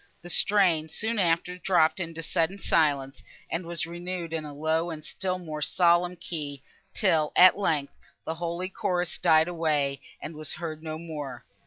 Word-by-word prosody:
The 175 - -5
strain, 180 -6 +4
soon 220 +7 -1
after, 180 0 +1
dropped 175 -3 +3
into 165 -2 -4
sudden 165 +5 0
silence, 145 -7 +1 0.3
and 165 +1 -2
was 170 -2 -2
renewed 175 0 -5
in 160 -1 -2
a 150 - -7
low 160 +3 0
and 155 -2 -7
still 185 +2 -3
more 155 -4 -6
solemn 175 +2 +3
key, 145 -5 -5 0.3
till, 160 -7 +2
at 185 0 +8
length, 155 -8 0 0.3
the 160 - -2
holy 170 +2 -3
chorus 180 -2 -2
died 160 -2 +5
away, 150 -5 0 0.2
and 160 - -7
was 155 -1 -3
heard 155 -2 -6
no 155 -1 -5
more. 150 -6 -7
165 Hz, 165 wpm, -27 LUFS, 155-180 Hz, 0.3 s, at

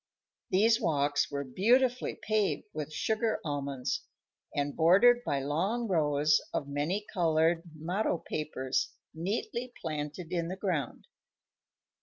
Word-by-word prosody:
These 225 +5 +4
walks 145 -5 +1
were 140 0 -3
beautifully 240 - +2
paved 215 -1 0
with 155 -1 -4
sugar 220 +7 0
almonds 140 -3 -2 0.5
and 145 0 -1
bordered 220 +9 +6
by 140 - -1
long 190 - 0
rows 150 -4 +3
of 140 - -2
many 150 +9 -1
colored 165 -2 +3
motto 175 +5 -1
papers 150 -5 -2 0.2
neatly 215 +8 -3
planted 155 +2 -4
in 170 -2 -1
the 185 - -4
ground. 170 - -2
165 Hz, 115 wpm, -30 LUFS, 145-210 Hz, 0.5 s, bordered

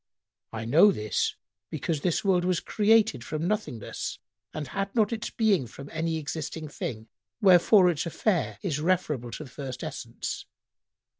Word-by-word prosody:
"—"I 110 0 -5
know 165 - +6
this 105 - -1 0.3
because 155 -4 -2
this 180 +4 0
world 185 -2 +3
was 180 -1 +1
created 215 - +3
from 155 +5 -3
nothingness 180 - -3 0.3
and 150 -3 -5
had 195 +2 -3
not 220 -1 +3
its 220 - -3
being 200 - +2
from 135 +4 -11
any 160 0 -1
existing 155 0 -5
thing; 110 -5 -5 0.3
wherefore 190 -1 +6
its 170 -2 0
affair 180 +2 0
is 160 -7 -1
referable 155 -8 0
to 155 - -6
the 130 - -13
first 130 -2 -6
essence. - - -5
165 Hz, 150 wpm, -27 LUFS, 140-195 Hz, 0.3 s, know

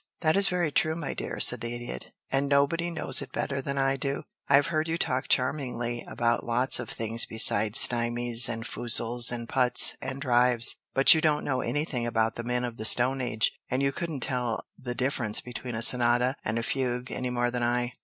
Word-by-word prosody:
"That 155 -2 +2
is 200 0 +5
very 175 -4 -1
true, 155 +2 +1
my 160 -4 -5
dear," - - -6
said - - +4
the 120 0 -4
Idiot. 120 0 -8 0.2
"And 140 +1 +1
nobody 145 +5 +1
knows 170 - +2
it - - -9
better 140 -1 -3
than 140 +1 -5
I 135 0 +1
do. 140 +1 -3 0.3
I've 140 0 +4
heard 155 +1 0
you 165 +1 -2
talk 130 -3 -2
charmingly 125 -3 -1
about 120 0 -1
lots 120 +3 +2
of 120 - -6
things 115 +1 +1
besides 110 -1 +4
stymies, 120 0 +1
and 115 -1 -5
foozles, 120 0 +2
and 120 -1 -6
putts, 125 0 +4
and 135 +1 -5
drives, 125 -3 +3 0.2
but 135 +1 +7
you 160 - 0
don't 150 -1 0
know 130 -2 -1
anything 145 -5 -3
about 110 -1 0
the 120 - -6
men 125 +1 -1
of 120 -1 -7
the 110 - -6
Stone 130 +4 +1
Age, 110 -3 0 0.2
and 130 +2 -1
you 135 - +1
couldn't 155 -2 -5
tell 125 -3 -2
the 125 -1 -6
difference 125 -4 -1
between 125 -1 -8
a 110 - -3
sonata 125 +2 +2
and 110 +1 -3
a 115 - -2
fugue 125 -1 -3
any 125 - -4
more 120 0 -1
than 125 0 -3
I. 120 0 0
125 Hz, 205 wpm, -26 LUFS, 120-140 Hz, 0.3 s, but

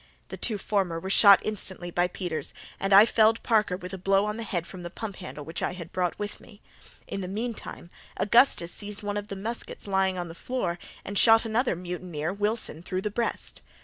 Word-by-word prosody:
The - - -5
two 220 -3 +1
former 190 -5 -1
were 190 +3 -4
shot 200 -1 +8
instantly 190 -4 -3
by 175 +1 +2
Peters, 175 -3 -4 0.2
and 195 - -1
I 200 +2 +9
felled 225 0 +3
Parker 215 -5 +2
with 180 0 -8
a 190 - -5
blow 195 +2 +3
on 210 +1 -3
the - - -4
head 180 -6 -2
from 185 0 -9
the 175 - -6
pump 200 +1 -6
handle 150 -6 -8
which 160 +1 -5
I - - -1
had 170 -2 -9
brought 180 -2 -1
with 205 0 -5
me. 205 -4 -16 0.5
In 195 - -4
the 185 - -4
meantime, 215 -3 -5 0.3
Augustus 210 -5 +4
seized 205 0 -5
one 205 0 -2
of 205 0 -3
the 200 - -5
muskets 225 +5 -5
lying 190 -2 +1
on 175 -1 -3
the 165 - -8
floor 175 -3 -3 0.3
and 200 0 0
shot 225 0 +7
another 225 0 +1
mutineer 175 -2 -4
Wilson 205 -5 -1
through 185 +1 -3
the 210 - -3
breast. 235 +2 -2
195 Hz, 210 wpm, -27 LUFS, 180-215 Hz, 0.5 s, I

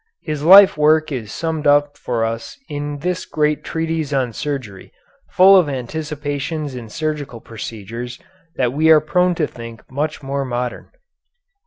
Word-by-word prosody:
His 155 -3 -4
life 190 +1 +8
work 155 +1 +3
is 115 -6 -5
summed 160 -2 -2
up 145 0 +3
for 115 -2 -2
us 115 0 -5
in 145 0 -4
this 180 +1 -2
great 150 -1 -1
treatise 160 -2 -2
on 130 -4 0
surgery, 125 -9 -5 0.4
full 190 +2 +7
of 180 -6 +4
anticipations 145 +2 -4
in 120 -3 -8
surgical 150 -2 -4
procedures 115 +2 -7 0.4
that 125 -1 0
we 155 +3 +2
are 160 -1 +8
prone 180 +4 +1
to 160 - +1
think 115 -4 -10
much 145 +2 -3
more 140 +1 -2
modern. 125 -1 -4
145 Hz, 150 wpm, -19 LUFS, 125-155 Hz, 0.4 s, life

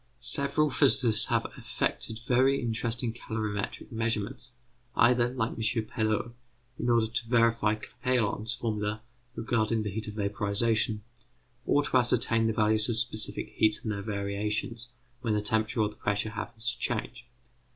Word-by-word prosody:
Several 140 +5 +5
physicists 125 -4 +5
have - - 0
effected 110 - -3
very 130 +2 +3
interesting 115 0 0
calorimetric 110 -3 -5
measurements, 115 +2 -2 0.5
either, 120 0 +4
like 125 -3 -2
M. - - -10
Perot, 110 0 -1 0.5
in 120 - -1
order 115 -2 +3
to 115 +1 -3
verify 115 -2 +2
Clapeyron's 110 0 -2
formula 105 -2 -3 0.3
regarding 115 -1 0
the 105 - -4
heat 110 +2 -5
of 105 - -7
vaporization, 105 +1 0 0.6
or 145 - +3
to 130 - +1
ascertain 115 -2 +2
the - - +1
values 110 +1 +2
of 115 - -1
specific 110 -1 0
heats 110 -1 +2
and 110 - -2
their 100 -1 -4
variations 105 +3 -3 0.3
when 110 -4 0
the - - +1
temperature 110 +2 +1
or 105 - +1
the 105 - -14
pressure 105 +1 -1
happens 115 +2 -4
to 120 - -12
change. 120 +1 -3
110 Hz, 145 wpm, -28 LUFS, 105-120 Hz, 0.6 s, Several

